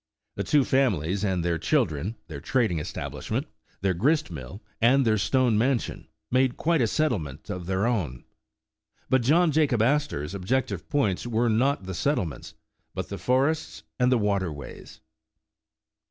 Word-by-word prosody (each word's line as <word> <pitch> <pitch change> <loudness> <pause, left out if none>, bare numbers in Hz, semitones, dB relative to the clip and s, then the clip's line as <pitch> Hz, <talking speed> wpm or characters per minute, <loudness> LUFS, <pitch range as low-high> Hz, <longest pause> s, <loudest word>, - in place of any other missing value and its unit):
The - - -3
two 145 -2 +3
families 100 - +1
and 95 -4 0
their 85 -2 0
children, 100 - 0
their 70 -4 -7
trading 115 - +1
establishment, 75 - -4 0.4
their 95 -1 +2
grist 145 - +1
mill, 75 - -8 0.2
and 130 +3 +5
their 110 -2 +3
stone 120 +2 +2
mansion, 125 +1 -1 0.2
made 130 0 +2
quite 165 -2 +2
a 115 - +3
settlement 105 - -2
of 90 -1 -5
their 95 +2 0
own. 90 - -1 0.9
But 130 -1 +4
John 160 +7 +4
Jacob 140 -7 +2
Astor 135 - +1
's 75 - -8
ob 95 -2 -7
jective 115 -8 -1
points 120 -7 0
were 120 0 +1
not 125 +2 +2
the 95 0 -5
settlements, 90 - -2 0.4
but - - -4
the - - -5
forests 135 +5 0 0.2
and 125 0 +3
the 125 - +4
water 100 -5 0
ways. 70 -2 -10
115 Hz, 155 wpm, -26 LUFS, 90-135 Hz, 0.9 s, and